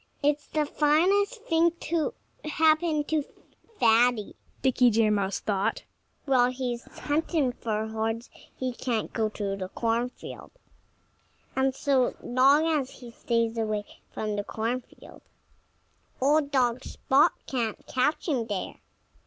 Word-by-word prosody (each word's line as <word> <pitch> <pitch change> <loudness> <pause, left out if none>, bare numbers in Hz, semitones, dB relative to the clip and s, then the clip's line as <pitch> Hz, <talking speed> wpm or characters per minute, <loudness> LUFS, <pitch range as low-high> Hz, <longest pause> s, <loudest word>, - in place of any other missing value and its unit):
"It's 295 0 +1
the 305 -1 0
finest 380 +11 +2
thing 330 -7 +2
that 340 0 +1
could 330 -1 -1 0.4
happen 315 0 +3
to 305 0 0 0.6
Fatty," 230 -1 +3 0.3
Dickie 250 -1 +4
Deer 220 -1 +3
Mouse 200 -1 0
thought. 200 -2 -1 0.4
"While 255 -3 +4
he's 250 -2 -4
hunting 300 -2 -1
for 220 -3 -3
horns 225 +2 -3 0.3
he 255 -1 -3
can't 235 -3 -2
go 220 -1 0
to 200 -2 -3
the 185 -1 -5
cornfield. 235 +4 -3 1.1
And 265 0 +1
so 270 -3 +1
long 270 +5 +4
as 300 -5 0
he 245 -2 -12
stays 230 -1 -1
away 215 -2 -1 0.3
from 210 -1 -3
the 205 - -1
cornfield, 230 +4 -5 1.0
old 285 +2 +3
dog 255 -2 +1
Spot 275 +2 +2
can't 235 -5 -3
catch 275 +7 0
him 250 -8 0
there." 205 -4 -4
250 Hz, 130 wpm, -27 LUFS, 225-295 Hz, 1.1 s, Dickie